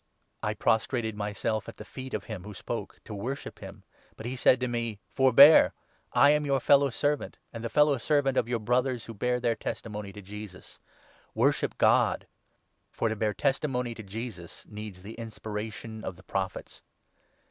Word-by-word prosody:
I - - -1
10 - - -16
prostrated 110 0 +1
myself 105 +1 -2
at - - -11
the 105 - -9
feet 130 +2 -6
of - - -3
him 105 -6 -7
who 105 0 -9
spoke - - -5
to - - -7
worship 125 +8 -5
him, - - -10 0.3
but 110 - -8
he 125 +2 -3
said 130 0 +4
to 125 - +1
me 115 -3 -2
— - - -46
' - - -38
Forbear; 135 +3 +8 0.4
I 145 - +6
am 150 0 +2
your 140 -2 +1
fellow 140 +1 +5
servant, 145 +4 -1 0.2
and 115 -1 -6
the 115 - -2
fellow 150 0 +4
servant 140 0 +2
of 115 - +2
your 120 - +1
Brothers 125 +2 0
who 115 - -8
bear 125 +4 0
their 120 -1 +1
testimony 105 -4 -5
to 105 - -9
Jesus. 105 -1 -10 0.6
Worship - - +1
God. - - +3 0.7
For 115 - 0
to 110 - -1
bear 105 -1 -1
testimony 130 -2 0
to 115 - -9
Jesus 105 -4 -7
needs 105 -3 -8
the 105 +3 -8
inspiration 110 0 -6
of 95 - -5
the 90 - -17
Prophets.' 95 0 -4
115 Hz, 185 wpm, -28 LUFS, 105-130 Hz, 0.7 s, Forbear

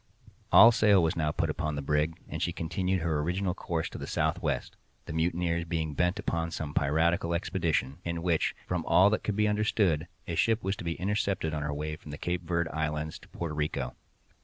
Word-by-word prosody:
All 115 - +10
sail 105 -5 +4
was 80 +3 +1
now 75 -2 0
put - - 0
upon 75 -1 -2
the 70 - -3
brig, 75 +3 0
and - - -5
she 85 - +1
continued 90 +3 -1
her 80 -2 0
original 90 +4 0
course 85 -3 -2
to - - -7
the - - -6
southwest—the - - -3
mutineers 85 +1 0
being 80 -2 -2
bent 90 +5 +1
upon 85 0 -1
some 75 -3 -5
piratical 85 +4 +2
expedition, 85 -5 -1
in 85 -1 -3
which, 85 -3 +1
from 90 -2 -2
all 95 +3 +6
that 110 - 0
could 105 - -1
be 105 0 +2
understood, 105 -6 +1 0.2
a 85 - -3
ship 115 +6 +2
was 95 +1 0
to - - -7
be 85 -1 -2
intercepted 95 -4 -1
on 75 - -2
her 75 0 -2
way 75 +1 -3
from 80 - -13
the 75 - -6
Cape 90 +2 -2
Verd 85 0 -1
Islands 75 -1 -3
to - - -17
Porto 85 -3 -5
Rico. 75 -4 -2
85 Hz, 205 wpm, -29 LUFS, 75-90 Hz, 0.2 s, All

